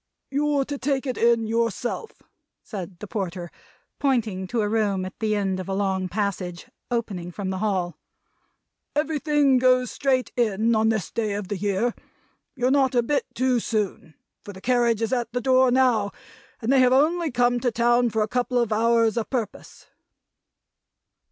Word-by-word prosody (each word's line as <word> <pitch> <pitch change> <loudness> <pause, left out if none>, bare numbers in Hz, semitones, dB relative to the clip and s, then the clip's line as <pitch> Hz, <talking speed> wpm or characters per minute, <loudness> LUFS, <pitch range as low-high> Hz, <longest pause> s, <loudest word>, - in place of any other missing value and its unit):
"You're 285 0 +1
to 285 0 -5
take 275 0 -1
it 255 -2 -2
in 235 -1 +3
yourself," 230 - -2 0.4
said 190 -4 -7
the 210 - -8
Porter, 185 -4 -4 0.5
pointing 220 -9 0
to 235 +3 -1
a 210 - 0
room 205 -3 0
at 185 - -9
the 215 -1 0
end 195 -2 -1
of 185 - -6
a 195 - -1
long 190 -2 -1
passage, 180 -3 -3 0.2
opening 210 -8 -3
from 190 +1 -4
the 190 - -3
hall. 185 -4 -1 1.0
"Everything 295 -3 +2
goes 255 0 +3
straight 260 -2 0
in, 225 -1 +1
on 220 0 +3
this 215 -6 -1
day 215 -3 -1
of 200 -2 -4
the 205 - -1
year. 205 +4 0 0.6
You're 250 -1 +1
not 265 -2 +3
a 240 - +4
bit 285 +4 0
too 255 -1 +2
soon; 210 -8 -3 0.3
for 205 - -9
the 190 - -11
carriage 235 -2 +2
is 225 - -1
at 240 -2 -1
the 245 - 0
door 260 +1 +4
now, 245 -5 +3 0.5
and 230 - +1
they 270 - +5
have 255 0 +5
only 320 +5 +3
come 245 -1 +2
to 245 - +1
town 240 +1 +2
for 220 0 0
a - - -2
couple 250 +2 -1
of 235 -3 +1
hours, 230 +1 +2
a'purpose." 230 -2 -4
230 Hz, 170 wpm, -24 LUFS, 205-255 Hz, 1.0 s, they